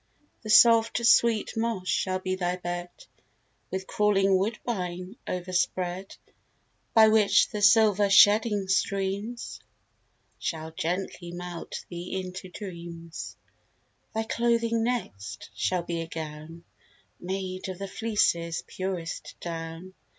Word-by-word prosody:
The 215 - -8
soft 230 +1 +6
sweet 230 -2 +4
moss 225 -5 -2
shall 185 0 +1
be 185 0 -3
thy 180 -1 -1
bed, 175 0 -4 0.8
With 190 0 -4
crawling 195 -2 +3
woodbine 190 -2 -2
over 180 0 -4
spread: 180 +1 -1 0.8
By 220 -1 +8
which 215 -2 +4
the 210 -2 -4
silver 205 -1 +5
shedding 205 0 +5
streams 200 +4 -1 0.8
Shall 160 -1 -4
gently 175 +1 -3
melt 175 -1 -6
thee 175 +2 -5
into 185 0 -7
dreams. 170 -4 -8 0.8
Thy 220 - +1
clothing 230 0 +1
next, 105 - -4
shall 175 - 0
be 170 -1 -3
a 165 - -5
gown 160 +1 -7 0.6
Made 185 0 -4
of 185 - -5
the 195 +1 -5
fleeces' 180 -6 0
purest 185 -3 -5
down. 165 +2 -6
185 Hz, 115 wpm, -27 LUFS, 175-210 Hz, 0.8 s, By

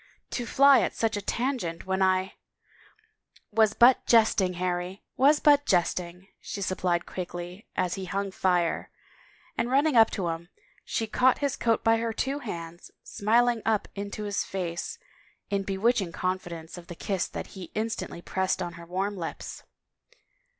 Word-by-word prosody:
" - - -49
To 240 - -5
fly 275 +2 +6
at - - -1
such 225 -1 0
a 205 - -2
tangent 230 -7 -2
when 190 0 -1
I 185 0 +2 0.3
— - - -29
" 435 0 -41
" - - -31
Was 220 0 +3
but 245 +2 +6
jesting, 215 -5 +4
Harry, 180 +1 -3
was 290 +3 +5
but 290 -1 +4
jesting," 180 0 0
she 205 - -6
sup 185 0 -2
plied 175 -2 +1
quickly 175 +2 -7
as 180 -1 0
he 190 - -4
hung 195 +1 -2
fire, 180 -3 0 0.7
and 235 +1 +1
running 275 -3 +6
to 190 -5 -3
him, 165 +1 -5 0.3
she 225 - -2
caught 250 +4 +3
his 285 -2 -1
coat 230 -1 +1
by 225 0 +4
her 230 0 -2
two 270 +5 -1
hands, 170 - -7
smiling 235 +2 +2
up 220 -2 +1
into 200 +1 -5
his 205 -1 -1
face 180 - -4 0.5
in 200 -1 +1
bewitching 195 0 +1
confidence 175 -2 -4
of 170 - -14
the 175 - -8
kiss 190 +1 -2
that - - -7
he 185 -4 -8
instantly 215 -5 -3
pressed 190 0 -1
on 175 -2 -4
her 170 0 -11
warm 195 +3 -2
lips. 170 -4 -6
195 Hz, 170 wpm, -27 LUFS, 180-230 Hz, 0.7 s, fly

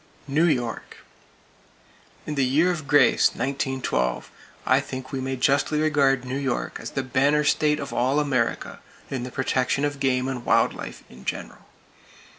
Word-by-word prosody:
New 150 +4 +2
York: 125 -8 -2 1.3
In 150 - -3
the 140 -2 +1
year 150 +8 +3
of 155 -5 -5
grace, 145 - +4
1912, 130 - -2 0.3
I - - +4
think 130 0 -7
we 135 - -3
may 130 0 -2
justly 140 +4 +1
regard 140 -4 +2
New 130 +2 -3
York 135 -3 -2
as - - -6
the 135 - -3
banner 140 +4 +2
state 150 0 +2
of 140 - -6
all 130 +4 +2
America 130 -6 -1 0.3
in 130 -3 -2
the 125 +1 -6
protection 130 +2 0
of 145 -1 -3
game 130 -1 +1
and 130 -2 -4
wild - - +3
life - - -8
in 65 +1 -15
general. - - -6
135 Hz, 160 wpm, -24 LUFS, 130-145 Hz, 1.3 s, grace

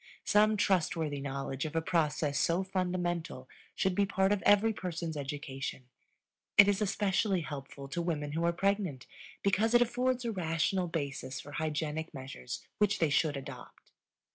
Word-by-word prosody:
Some 215 +1 +4
trustworthy 160 -7 +1
knowledge 135 -1 -3
of 155 - -5
a - - +4
process 150 -3 +1
so 170 +3 +2
fundamental 175 -7 -2 0.3
should 190 - +1
be 200 +1 +2
part 195 0 +2
of 205 -2 +1
every 210 +2 +5
person's 170 -4 -4
education; 135 -3 -5 0.7
it 205 - +10
is 205 0 +2
especially 195 -1 +1
helpful 140 -2 -7
to 170 - -2
women 150 -4 -2
who 165 +3 -1
are 170 - +3
pregnant 190 -6 -1 0.4
because 215 +4 +3
it 240 - +7
affords 250 +1 -1
a 230 - 0
rational 175 0 0
basis 140 -5 -4
for 145 - -10
hygienic 155 0 -3
measures 130 -2 -7
which 205 -1 +3
they 160 -3 +2
should 145 -1 +2
adopt. 135 -2 -10
170 Hz, 155 wpm, -31 LUFS, 145-195 Hz, 0.7 s, it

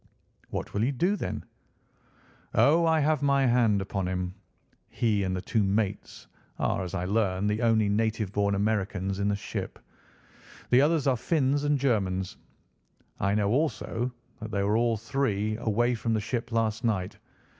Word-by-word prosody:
"What - - -5
will 100 - 0
you 130 - +2
do, 175 +9 +1
then?" - - -4 1.1
"Oh, 165 +3 +5
I 160 -1 +3
have 150 -1 +2
my 140 -1 +3
hand 115 -5 +3
upon 95 -1 -3
him. 90 0 -2 0.6
He 105 -4 +1
and 95 -1 -1
the 90 - -4
two 110 +2 +1
mates, 100 0 -2 0.3
are - - 0
as 90 +1 -5
I 90 -1 -2
learn, 100 -1 0
the 105 +2 0
only 110 -2 +3
native 110 -1 0
born 100 -1 +1
Americans 100 -2 -1
in 100 - 0
the 100 - +1
ship. 100 - -5 0.9
The 125 +2 +6
others 150 0 +2
are 135 -2 +3
Finns 140 +2 +1
and 145 0 +2
Germans. 95 -8 0 0.8
I 100 +1 +1
know, 105 -1 +1
also, 125 -3 -1 0.3
that 110 - -6
they 100 -2 -1
were 105 +2 +1
all 115 0 +2
three 110 -3 -1
away 120 +2 +1
from 115 -1 -1
the - - +1
ship 115 +3 -3
last 115 0 0
night. 100 -6 -1
110 Hz, 165 wpm, -28 LUFS, 100-125 Hz, 1.1 s, The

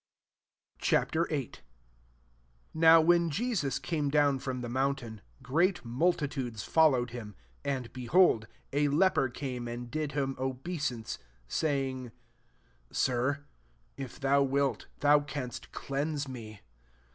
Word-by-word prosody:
C«.Vin. - - +3 0.2
1 140 -6 -2 1.2
NOW, 160 0 +7
when 170 +1 +4
y^Mi* 235 +11 -1
eame 145 - -1
dawn 145 -2 +3
from 130 -1 -4
the 120 - -4
nMMintam, 130 -3 -1 0.2
great 165 +7 +1
multitudes 135 - -1
followed 130 -7 +3
him 110 -4 -7 0.3
2 140 - -2
And, 130 -4 -3
behold 125 -2 +3 0.3
a 145 +1 +3
leper 150 -2 +3
came 125 -2 -5
and 120 0 -6
did 155 -1 -2
hinir 135 -1 0
obeisance^ 130 -2 -3 0.3
saying, 135 - -1 0.8
<«Slr, 130 +3 0 0.5
if 135 0 -7
thou 140 0 +3
wik, 140 -3 +1 0.2
thou 145 0 +6
canst 135 -3 -6
cleanse 145 +1 -2
me." 110 -5 -8
135 Hz, 115 wpm, -30 LUFS, 125-150 Hz, 1.2 s, NOW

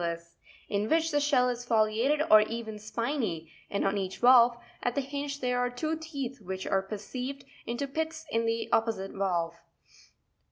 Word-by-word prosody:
Sponpyivus, 170 0 -4 0.4
in 205 +1 -1
which 325 0 +2
the 290 - +3
shell 280 -4 +3
is 245 -1 -2
foliated 230 +6 +2
or 215 0 +10
even 220 -1 -4
spiny, 215 - -3 0.2
and 200 - -1
on 195 +1 +1
each 190 -1 -4
valve 240 -1 +6 0.2
at 245 - -1
the 280 - +1
hinge 280 +1 -4
there 250 -1 +1
are 245 0 +1
two 310 +6 -2
teeth 280 -6 -6
which 190 -1 -5
are 195 0 0
received 255 +6 -5 0.2
into 240 +4 -2
pits 320 +2 -3
in 230 0 +1
the 230 0 -1
opposite 225 -4 +1
valve: 175 -4 0
11. 170 - -24
235 Hz, 175 wpm, -29 LUFS, 200-275 Hz, 0.4 s, or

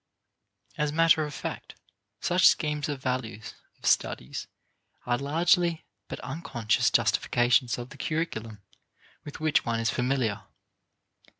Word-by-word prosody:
As 150 -1 +1
matter 165 0 +4
of 150 - -6
fact, - - -6 0.5
such 180 +1 +4
schemes 150 -1 +1
of 140 -2 -5
values 115 -4 -3 0.2
of - - -14
studies 65 - 0 0.6
are 120 - +1
largely 170 +3 +2 0.2
but - - -6
unconscious 125 -5 0
justifications 120 0 +2
of 120 0 -7
the - - -13
curriculum 115 - -3 0.6
with 145 - -9
which 155 -1 +2
one 115 -1 -1
is 115 0 +1
familiar. 125 -4 0
135 Hz, 120 wpm, -27 LUFS, 120-155 Hz, 0.6 s, matter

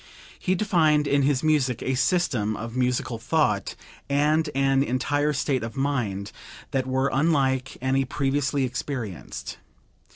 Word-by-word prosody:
He 185 - +1
defined 160 -7 +3
in 140 0 +2
his 135 0 +1
music 145 -6 +1
a 130 - 0
system 125 - +1
of 115 +1 -6
musical 125 -2 0
thought 115 -7 0 0.3
and 150 +3 +2
an 135 0 +3
entire 145 +3 0
state 140 -2 0
of 115 +4 -6
mind 120 -8 -1 0.4
that 130 -1 -1
were 130 +1 +1
unlike 135 -3 +1
any 135 +1 +2
previously 140 +1 0
experienced. 125 - -5
135 Hz, 130 wpm, -25 LUFS, 125-145 Hz, 0.4 s, defined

